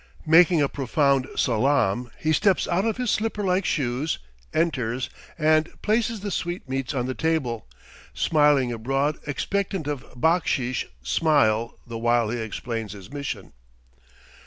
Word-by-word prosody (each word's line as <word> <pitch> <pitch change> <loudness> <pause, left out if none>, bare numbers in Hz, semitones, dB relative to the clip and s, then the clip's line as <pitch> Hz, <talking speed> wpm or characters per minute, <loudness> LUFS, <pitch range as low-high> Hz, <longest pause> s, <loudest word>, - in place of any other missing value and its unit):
Making 165 0 +6
a - - +3
profound 135 0 +1
salaam, 125 -1 +1
he 155 0 0
steps 195 +3 +2
out 180 +4 +1
of 225 0 0
his 250 -3 0
slipper 215 -1 -1
like 185 0 +1
shoes, 135 +1 0 0.3
enters, 130 -7 -1 0.3
and 155 +1 +3
places 220 0 +1
the 205 0 -4
sweetmeats 140 -7 -3
on 125 -2 0
the 130 - -2
table, 135 -8 -1 0.4
smiling 145 -5 +3
a 115 - -4
broad 135 +5 0
expectant 190 +4 -2
of 145 -3 -3 0.2
backsheesh 140 -6 +1 0.2
smile 115 - +2
the 115 -1 -6
while 120 -1 +2
he 120 - -2
explains 110 -1 -4
his 100 -2 -12
mission. 140 -9 -5
140 Hz, 135 wpm, -25 LUFS, 120-165 Hz, 0.4 s, Making